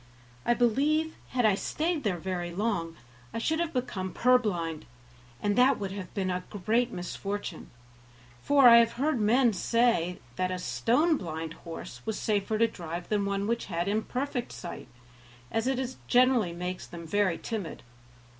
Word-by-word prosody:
I 240 - +4
believe, 290 +7 +2
had 245 -2 0
I 215 - +5
stayed 310 - -1
there 195 -5 0
very 175 0 -3
long, 175 -3 -2 0.4
I - - -1
should 320 +8 0
have 340 -1 -1
become 205 - -3
purblind, 200 -11 +1 0.6
and 205 0 +2
that 255 +2 +5
would 195 -2 -4
have 195 -3 -6
been 190 -2 0
a 180 0 -2
great 225 +5 0
misfortune, 195 0 -5 0.7
for 280 -3 +6
I 235 -1 +10
have 230 0 +4
heard 275 +1 0
men 235 +2 +4
say 195 -4 +2 0.2
that 185 0 0
a 185 - -2
stone 285 - +2
blind 160 - -5
horse 165 -8 -9
was 220 - -3
safer 210 0 0
to 230 +1 +4
drive 175 -4 -6
than 205 -2 +1
one 200 0 -1
which 235 +2 -1
had 170 -1 -2
imperfect 245 +5 -2
sight, 175 - -8 0.6
as 225 +2 0
it 260 -1 -1
generally 245 -7 +4
makes 180 +1 -5
them 170 -1 -9
very 190 0 +1
timid. 210 -8 -5
210 Hz, 160 wpm, -29 LUFS, 180-245 Hz, 0.7 s, I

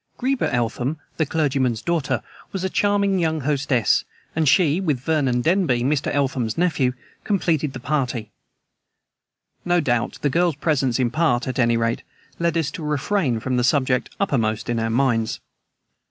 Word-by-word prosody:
Greba 260 0 0
Eltham, 125 +5 -1 0.2
the 155 - +1
clergyman's 135 -7 0
daughter, 165 -3 -1 0.3
was 190 -2 -4
a 190 - -1
charming 200 -2 +2
young 160 -2 0
hostess, 135 -4 +1 0.3
and 160 -3 +3
she, 170 0 +3
with 150 -9 0
Vernon 135 -3 +1
Denby, 160 -6 +2
Mr. 140 +2 0
Eltham's 130 -5 -1
nephew, 160 -8 +1 0.3
completed 160 -8 0
the 130 - -6
party. 125 -5 -2 1.3
No 175 0 +2
doubt 120 -7 0
the 145 - +3
girl's 170 +1 +2
presence, 140 -5 +1
in 125 -3 +1
part, 145 -6 +1
at 130 0 -3
any 115 -1 +3
rate, 115 0 0 0.4
led 170 -1 +1
us 160 -4 0
to 160 - -7
refrain 150 - 0
from 130 +2 -1
the 125 - +2
subject 130 -1 +2
uppermost 115 - 0
in 115 - 0
our 115 0 -1
minds. 115 -2 +1
140 Hz, 155 wpm, -22 LUFS, 125-165 Hz, 1.3 s, and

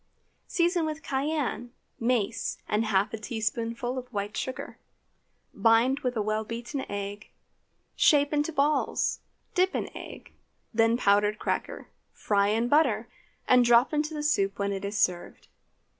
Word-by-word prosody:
Season 345 0 +1
with 310 0 -4
cayenne, 270 -4 -2 0.3
mace, 230 -2 0
and 215 +2 +1
half 200 -1 +1
a 225 - -4
teaspoonful 230 +3 -3
of 250 - -10
white 205 -1 -4
sugar. 260 - -5 0.7
Bind 235 +4 +3
with 250 -3 -2
a 215 - +1
well 215 +1 -1
beaten 235 +5 -5
egg; 205 +1 -5 0.7
shape 290 -1 +4
into 295 +2 +1
balls; 295 0 +1 0.3
dip 370 +1 +2
in - - -4
egg, - - -10 0.4
then 225 +1 +3
powdered 205 -1 +3
cracker, - - -3 0.3
fry 200 -1 +1
in 225 +3 +1
butter, 245 -6 +2 0.4
and 250 -1 +6
drop 240 +4 +4
into 305 +1 -1
the 295 - -3
soup 195 -10 +1
when 200 0 -1
it 195 - -5
is 200 +1 -3
served. 180 -3 -1
235 Hz, 145 wpm, -27 LUFS, 210-285 Hz, 0.7 s, and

